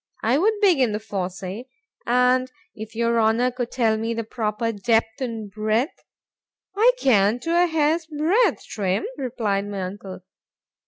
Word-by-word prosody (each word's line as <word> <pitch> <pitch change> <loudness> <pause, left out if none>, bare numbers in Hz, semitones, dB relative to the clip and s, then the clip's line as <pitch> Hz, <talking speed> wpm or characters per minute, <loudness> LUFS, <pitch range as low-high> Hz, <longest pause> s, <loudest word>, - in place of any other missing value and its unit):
—I 245 +6 +2
would 425 +4 +2
begin 275 - +3
with 215 +1 -5
the 205 - -9
fossé, 190 +4 -4 0.4
and 250 +1 +2 0.2
if 220 +1 -9
your 235 0 +1
Honour 225 +3 +2
could 245 -1 -4
tell 225 -4 +1
me 225 +1 -2
the 230 - -2
proper 220 0 -2
depth 225 +3 0
and 225 -5 -4
breadth—I 235 - -2
can 215 - +3
to 330 - -3
a 355 - +4
hair's 320 0 +1
breadth, 325 +10 +1
Trim, 195 -1 -2
replied 225 -7 -2
my 200 -2 -4
uncle. 190 0 -7
230 Hz, 150 wpm, -23 LUFS, 210-260 Hz, 0.4 s, a